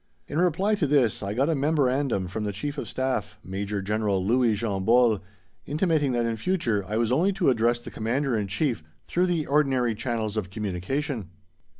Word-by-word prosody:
In 150 - -2
reply 180 +4 +2
to 185 -8 +1
this 135 -6 +2
I 100 +1 -3
got 135 +4 +2
a 165 - +2
memorandum 135 - +1
from 105 +4 -4
the 105 - -1
Chief 145 +8 -4
of - - -5
Staff, 130 -5 -2
Major 100 +2 -3
General 100 -2 0
Louis 120 0 +3
Jean 100 -3 -2
Bols, 115 -1 +4 0.5
intimating 155 -2 +1
that 120 -1 +1
in 115 -1 -1
future 115 - 0
I 105 +2 -1
was 115 0 +1
only 170 +10 +3
to 185 -8 +3
address 120 0 +2
the 120 - -10
Commander 125 +4 -1
in 105 -2 -1
Chief 110 - -1 0.2
through 180 +1 +1
the 170 -4 0
ordinary 135 -5 +2
channels 110 -1 -3
of 95 -4 -2
communication. 105 - -3
120 Hz, 190 wpm, -26 LUFS, 105-145 Hz, 0.5 s, Bols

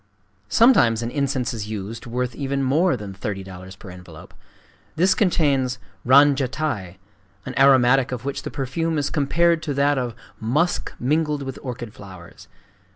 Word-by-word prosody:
Sometimes 120 - +4
an 115 - -3
incense 135 -3 -1
is 105 -2 -5
used 110 +3 -6
worth 125 +1 -2
even 135 +1 -2
more 150 +4 +2
than 105 -3 -8
$30.00 95 -1 -7
per 95 - -11
envelope: 90 -3 -13 0.6
this 185 +3 +3
contains 145 - +1 0.3
ranjatai, 135 - +2 0.5
an - - -5
aromatic 135 -1 +4
of 125 0 -5
which 140 - -3
the - - -6
perfume 155 +5 -2
is 145 -1 -1
compared 165 +3 +2
to 150 -3 -3
that 140 0 +2
of 120 -3 -4 0.2
"musk 150 +11 0
mingled 150 +2 0
with 135 -1 -6
orchid 120 -4 -6
flowers." 95 -4 -13
130 Hz, 145 wpm, -22 LUFS, 115-145 Hz, 0.6 s, Sometimes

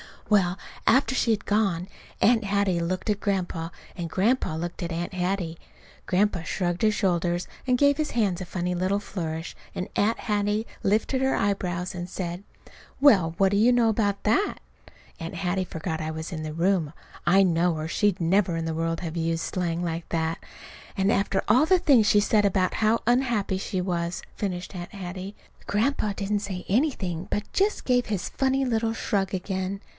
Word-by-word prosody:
Well, 190 -3 +3 0.3
after 265 0 +4
she 235 - +2
had 215 -2 -1
gone 195 -4 +1 0.3
Aunt 225 -1 +4
Hattie 200 -3 +1
looked 185 +5 -2
at 205 -1 +1
Grandpa 180 -5 -2 0.3
and 170 -2 -4
Grandpa 200 -1 +1
looked 175 +3 -5
at 170 -1 -3
Aunt 170 +2 -3
Hattie. 180 -2 -2 0.5
Grandpa 190 -2 +1
shrugged 175 0 -2
his 215 -1 +4
shoulders, 175 -4 0 0.2
and 250 -1 +3
gave 285 +1 +4
his 310 -1 -1
hands 200 -7 +1
a - - -4
funny 180 0 -2
little 185 +3 0
flourish; 165 -5 -5 0.2
and 185 - -3
Aunt 220 +3 +2
Hattie 210 0 0 0.2
lifted 220 +6 +1
her 265 0 +2
eyebrows 185 -2 -1
and 175 0 -5
said: 175 0 -4 0.6
"Well, 185 - +5
what 195 0 +4
do 200 - +2
you 235 +4 +5
know 235 -2 +4
about 205 -2 0
that?" 305 - +1 0.6
(Aunt 165 -1 -6
Hattie 185 0 -1
forgot 160 -1 -4
I 155 0 -3
was 160 +3 -6
in 160 -2 -4
the 155 -1 -4
room, 170 -2 +1 0.3
I 195 +3 +6
know, 175 -1 +2
or 155 +1 -4
she'd 200 0 +1
never 175 +1 +2
in 165 0 -2
the 165 - -2
world 165 +1 -1
have 170 -1 -4
used 165 0 0
slang 175 -2 -2
like 165 -1 -3
that!) 165 0 -1 0.6
"And 195 +1 +2
after 195 -1 +1
all 250 +8 +6
the 370 +3 +5
things 275 - +4
she's 205 +1 +4
said 210 -2 +3
about 190 -2 +1
how 220 +1 +2
unhappy 240 -6 +1
she 190 -1 -2
was!" 175 -1 -2
finished 185 -3 -4
Aunt 175 +2 -7
Hattie. 190 +1 -6 0.3
Grandpa 215 -1 +1
didn't 205 +1 -1
say 190 -3 -5
anything, 190 - 0
but 205 - -3
just 405 +2 +1
gave 245 -1 +3
his 205 -4 -3
funny 270 0 +1
little 225 -2 0
shrug 195 -3 -1
again. 190 +1 -3
190 Hz, 180 wpm, -26 LUFS, 175-210 Hz, 0.6 s, I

